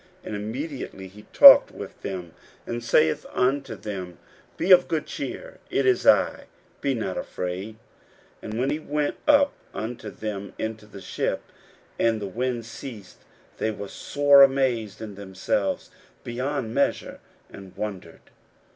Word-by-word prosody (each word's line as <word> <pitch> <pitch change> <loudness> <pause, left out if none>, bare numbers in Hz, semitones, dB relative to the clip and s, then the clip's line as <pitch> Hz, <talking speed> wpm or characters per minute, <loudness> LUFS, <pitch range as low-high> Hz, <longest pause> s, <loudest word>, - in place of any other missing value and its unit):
And 105 - -5
immediately 110 -2 -5
he 105 +3 -15
talked - - +10
with - - -10
them, 90 -3 -6 0.3
and 120 0 -4
saith 80 -9 +2
unto 135 +2 0
them, 95 -4 -7 0.4
Be 190 - 0
of 180 -1 +8
good 155 -2 -1
cheer: - - -7
it - - 0
is 385 -1 +2
I; - - +4 0.4
be 140 -2 0
not 100 -5 -3
afraid. 95 +4 -5 0.7
41:006:051 110 +3 -3
And 135 - 0
he 150 - -2
went 150 -1 -2
up 285 -1 +5 0.2
unto 110 -1 -5
them 100 -1 -6
into 110 -1 -5
the 100 -2 -11
ship; - - -2 0.6
and 115 -1 +2
the 105 - -4
wind 120 +3 -3
ceased: 115 -3 -10
and - - -31
they 110 - 0
were 100 -2 -6
sore 145 +5 +4
amazed 125 -6 +2
in 105 -2 -7
themselves 95 0 -2 0.3
beyond 125 -1 -3
measure, - - -1 0.3
and 95 -2 -12
wondered. 95 -6 -7
110 Hz, 145 wpm, -25 LUFS, 100-135 Hz, 0.7 s, talked